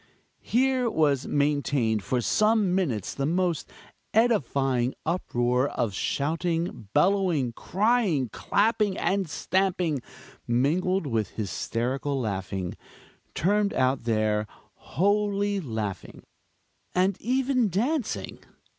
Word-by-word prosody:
Here 255 0 +1
was 145 - +1
maintained 140 -6 +1
for 125 +1 0
some 215 - +2
minutes 140 - -1
the 140 0 -1
most 175 -1 0 0.5
edifying 135 - +2
uproar 125 -6 +1
of 120 -7 -2
shouting, 165 - -2
bellowing, 170 - +2
crying, 195 - +1
clapping 210 - +1
and 195 -3 0
stamping, 180 -4 0 0.5
mingled 165 +10 +1
with 110 -7 -1
hysterical 125 +6 -2
laughing, 95 -4 -3 0.6
termed 205 +3 +1
out 130 -2 +1
there 110 -2 +1 0.3
"holy 205 +1 0
laughing," 110 - -5 0.7
and 185 +1 +3
even 255 -1 +1
dancing! 240 - -2
160 Hz, 95 wpm, -26 LUFS, 125-200 Hz, 0.7 s, and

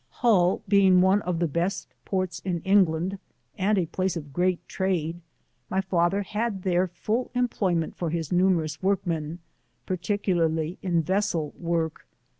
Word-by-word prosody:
Hull 190 -7 +2
being 190 -2 +5
one 190 +3 +4
of 180 -3 -2
the 170 0 +1
best 170 +6 -2
ports 185 -2 -2
in 175 -3 -2
England, 190 -1 +2 0.4
and 205 +1 +1
a 180 - +2
place 185 +2 -2
of 145 -4 -8
great 180 +2 0
trade, 175 -3 -1 0.5
my 190 - 0
father 190 +1 +1
had 210 -1 -3
there 185 0 +2
full 215 +8 -2
employment 190 -9 0
for 170 - -2
his 165 -2 -2
numer 180 -2 +3
ous 155 0 -6
workmen, 170 -5 -1 0.5
particularly 175 -4 0
in 170 -3 +1
vessel 185 -4 0
work. 165 -2 -2
180 Hz, 145 wpm, -26 LUFS, 170-195 Hz, 0.5 s, being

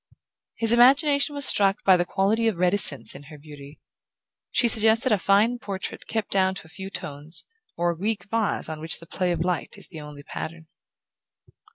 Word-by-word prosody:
His 225 -1 +4
imagination 280 +4 +3
was 285 -1 +4
struck 195 -1 +2
by 190 - +5
the 175 0 -1
quality 210 +5 -1
of 215 -6 -1
reticence 180 -5 +5
in 135 - -12
her 150 +1 -13
beauty. 145 -1 -14 0.7
She 240 - +1
suggested 225 +3 +3
a 210 - +2
fine 210 +6 +1
portrait 195 -3 -7
kept 220 -2 -4
down 190 -1 +1
to 190 - -10
a - - -17
few 190 +2 -8
tones, 150 -2 -6 0.3
or 175 0 0
a - - -7
Greek 215 +4 -3
vase 225 -1 -2
on 155 -1 -8
which 160 +1 -3
the 165 - -14
play 180 +1 -3
of 170 -1 -3
light 180 +2 -4
is 200 - -12
the 160 -4 -10
only 150 -1 -12
pattern. 160 +2 -8
190 Hz, 190 wpm, -23 LUFS, 160-225 Hz, 0.7 s, by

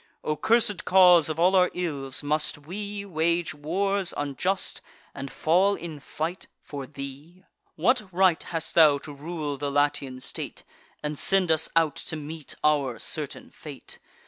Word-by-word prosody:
O 155 - -1
cursed 220 -1 +2
cause 180 -4 +6
of 155 +1 -3
all 180 +3 +4
our 180 -1 +5
ills, 145 -7 -3
must 150 +1 0
we 200 +7 -6
Wage 170 -1 0
wars 190 +6 -1
unjust, 145 +7 -2 0.3
and 135 0 -7
fall 185 +5 +3
in 165 -5 -7
fight, 160 +5 -5 0.2
for 140 -3 -7
thee! 145 +6 -9 0.3
What 210 +3 +1
right 185 -2 +3
hast 165 -2 -4
thou 155 -4 +6
to 145 +1 -9
rule 150 -1 -4
the 145 +1 -2
Latian 145 -2 0
state, 130 - -5 0.4
And 150 -1 -3
send 190 -3 +3
us 160 0 +2
out 160 -3 +3
to - - -4
meet 155 0 -7
our 140 -5 +2
certain - - -3
fate? - - -10
160 Hz, 150 wpm, -26 LUFS, 145-185 Hz, 0.4 s, cause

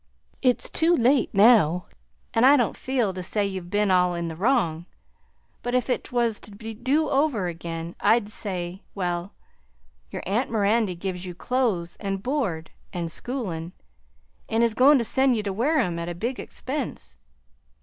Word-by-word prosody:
It's 250 -2 +2
too 335 +2 +3
late 255 -2 +3
now, 195 -5 +5 0.5
an' 225 - +3
I 280 +3 +7
don't 240 - +1
feel 245 -7 -1
to 185 - -5
say 205 +3 0
you've 190 -3 -5
ben 205 0 +1
all 180 -1 +3
in 170 -1 -3
the 160 - -6
wrong; 175 -5 +1 0.7
but 245 +1 -2
if 250 - +2
't 250 - -1
was 235 -3 +1
to - - -11
do 235 +9 -1
over 270 -8 +1
again, 170 -1 -5
I'd 225 -2 +3
say, 185 -3 -4
well, 175 0 -3 0.7
your - - -6
aunt 220 +8 0
Mirandy 210 -2 +1
gives 180 0 -4
you 175 - -7
clothes 200 -7 -1
and 195 -1 -4
board 220 - -2 0.2
and 170 -2 -3
schoolin' 180 -9 -4 0.8
and 225 +1 +2
is 230 -2 +2
goin' 275 +5 +6
to 235 - 0
send 265 +2 +2
you 215 - -2
to 200 -2 -2
Wareham 225 - +1
at 170 +1 -4
a 175 - -5
big 235 +8 -3
expense. 270 -1 -5
210 Hz, 165 wpm, -25 LUFS, 180-250 Hz, 0.8 s, I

